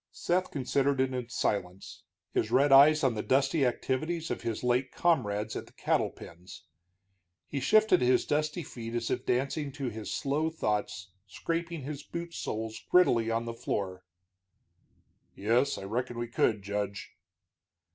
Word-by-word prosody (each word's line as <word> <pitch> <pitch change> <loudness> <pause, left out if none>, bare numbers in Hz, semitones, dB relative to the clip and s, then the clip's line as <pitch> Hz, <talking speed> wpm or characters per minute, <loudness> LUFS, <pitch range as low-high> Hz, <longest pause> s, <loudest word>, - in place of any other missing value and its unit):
Seth 180 +1 0
considered 140 0 0
it 130 0 +1
in 125 -2 -4
silence, 100 -5 -3 0.3
his 110 - 0
red 135 +4 +3
eyes 150 +3 +7
on 130 -3 +3
the 105 - -2
dusty 135 +4 +2
activities 155 +7 -2
of - - -3
his 115 0 -3
late 125 +2 +1
comrades 110 -10 0
at - - -5
the - - -19
cattle - - +1
pens. 90 +3 -12 0.8
He 140 - -3
shifted 215 +6 +4
his 125 0 +3
dusty 155 +3 -1
feet 115 -4 -7
as 115 -1 -2
if - - -2
dancing 140 +3 0
to 135 -3 -3
his 110 0 -6
slow 150 +3 0
thoughts, 105 - -2 0.2
scraping 165 - -3
his 145 +1 -5
boot 170 +3 -7
soles 110 -3 -4
grittily 120 -11 +4
on 115 +1 -1
the 115 - -4
floor. 95 -5 -3 1.3
"Yes, 120 +7 +1
I - - -7
reckon 120 +4 -3
we 120 0 -3
could, 110 -3 +1
Judge." 100 0 -4
125 Hz, 155 wpm, -30 LUFS, 110-145 Hz, 1.3 s, eyes